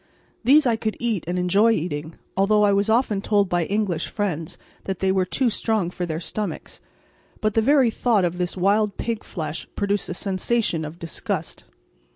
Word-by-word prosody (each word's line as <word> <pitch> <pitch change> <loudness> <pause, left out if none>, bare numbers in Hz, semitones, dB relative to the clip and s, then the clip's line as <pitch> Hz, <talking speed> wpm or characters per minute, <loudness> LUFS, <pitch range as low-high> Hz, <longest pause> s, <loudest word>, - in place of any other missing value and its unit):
These 280 +5 +6
I 235 -3 +2
could 220 -1 -3
eat 230 -7 -1
and 180 +1 -1
enjoy 200 +6 +4
eating, 155 -3 -3 0.2
although 210 +2 +3
I 205 -1 +4
was 200 +2 +1
often 220 -3 +2
told 205 -1 +2
by 175 -2 0
English 195 -5 -1
friends 170 -7 -3 0.3
that 190 -2 -2
they 190 +1 +1
were 190 -1 +2
too 245 +5 +1
strong 215 -6 0
for 180 -1 -4
their 160 -1 -3
stomachs; 210 +4 -5 0.6
but 215 -2 0
the 225 - +3
very 265 -1 +4
thought 220 -5 +2
of 175 +1 -2
this 180 +1 -2
wild 200 +2 +2
pig 230 -2 -3
flesh 155 -3 -5
produced 200 0 -1
a - - -3
sensation 195 -3 -1
of 155 +3 -8
disgust. 165 -3 -4
200 Hz, 185 wpm, -23 LUFS, 175-220 Hz, 0.6 s, These